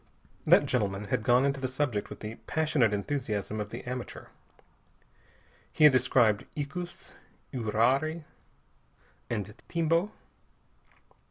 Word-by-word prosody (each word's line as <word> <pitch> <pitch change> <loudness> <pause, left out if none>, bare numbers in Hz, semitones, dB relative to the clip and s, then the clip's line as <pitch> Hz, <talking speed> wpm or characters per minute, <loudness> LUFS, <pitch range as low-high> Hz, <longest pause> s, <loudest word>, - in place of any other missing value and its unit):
That - - +6
gentleman 100 -4 -1
had - - +1
gone 125 +3 +4
into 140 0 0
the 130 - -1
subject 130 -5 -2
with - - -10
the 105 +1 -5
passionate 155 -8 +2
enthusiasm 110 -2 -2
of 105 - -5
the 115 - -7
amateur. 125 -1 -6 1.4
He 155 - +1
had 150 -3 +9
described 120 -4 +3
icus, 175 +5 -6 0.4
uirari 130 +8 +1 1.1
and 105 -3 -3
timbo. 170 +4 +1
125 Hz, 110 wpm, -29 LUFS, 110-150 Hz, 1.4 s, had